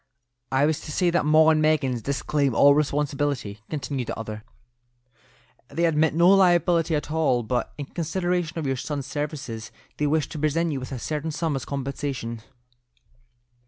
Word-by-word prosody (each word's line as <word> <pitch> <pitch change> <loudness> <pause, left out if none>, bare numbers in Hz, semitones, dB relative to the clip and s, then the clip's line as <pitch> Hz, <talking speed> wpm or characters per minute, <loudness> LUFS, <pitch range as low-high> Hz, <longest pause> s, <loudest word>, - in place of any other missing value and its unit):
"I 135 +2 +3
was 155 0 0
to 150 - -8
say 175 +3 +2
that 170 -3 +1
'Maw 155 +1 +6
and 155 -1 +2
Meggins' 145 -6 +1
disclaim 140 0 0
all 140 0 +7
responsibility," 145 -6 -1
continued 140 -4 -3
the - - -4
other. 110 -1 -6 1.2
"They 165 +6 0
admit 155 -1 +2
no 170 +2 +5
liability 175 -4 +4
at 150 0 -3
all, 150 -7 +2
but 120 +2 -2
in 145 - -4
consideration 175 +1 -2
of 160 - -2
your 135 -1 0
son's 140 +1 -4
services, 135 -5 -5 0.3
they 150 - +1
wish 155 0 +1
to 155 - -6
present 160 +3 +1
you 140 - -2
with 130 - -8
a 135 - -3
certain 150 +5 -3
sum 160 -1 -1
as 130 -3 -4
compensation." 135 -4 -4
150 Hz, 165 wpm, -25 LUFS, 135-160 Hz, 1.2 s, all